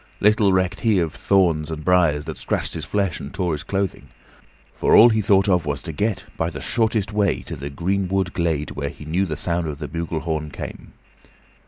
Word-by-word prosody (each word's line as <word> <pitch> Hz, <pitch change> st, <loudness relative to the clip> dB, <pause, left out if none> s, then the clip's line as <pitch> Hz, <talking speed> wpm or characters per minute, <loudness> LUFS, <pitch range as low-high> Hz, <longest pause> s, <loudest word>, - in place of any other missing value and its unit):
Little 105 Hz, -1 st, +4 dB
recked 95 Hz, 0 st, +1 dB
he 110 Hz, -4 st, +2 dB
of 85 Hz, -4 st, 0 dB
thorns 85 Hz, -6 st, +2 dB
and 80 Hz, -1 st, -6 dB
briers 85 Hz, -5 st, +3 dB
that -, -, -6 dB
scratched -, -, -2 dB
his -, -, -5 dB
flesh 100 Hz, -4 st, -1 dB
and 70 Hz, -, -7 dB
tore 90 Hz, -4 st, -1 dB
his 75 Hz, -, -3 dB
clothing, 95 Hz, +2 st, -3 dB, 0.7 s
for -, -, +3 dB
all 120 Hz, -, +9 dB
he 110 Hz, -1 st, +2 dB
thought 100 Hz, 0 st, +3 dB
of 90 Hz, -5 st, +2 dB
was 70 Hz, -1 st, -2 dB
to 85 Hz, -, -5 dB
get, 105 Hz, +7 st, -1 dB
by -, -, 0 dB
the -, -, -7 dB
shortest 110 Hz, -3 st, 0 dB
way, 105 Hz, -3 st, +1 dB
to -, -, -6 dB
the 70 Hz, +2 st, -6 dB
greenwood 95 Hz, +4 st, -1 dB
glade 80 Hz, -5 st, -1 dB
whence 70 Hz, 0 st, -5 dB
he 75 Hz, -, -10 dB
knew 90 Hz, +5 st, 0 dB
the 75 Hz, -3 st, -4 dB
sound 85 Hz, -1 st, -1 dB
of 75 Hz, -2 st, -4 dB
the -, -, -5 dB
bugle 85 Hz, -1 st, -3 dB
horn 80 Hz, -2 st, -3 dB
came. -, -, -8 dB
90 Hz, 210 wpm, -22 LUFS, 80-100 Hz, 0.7 s, all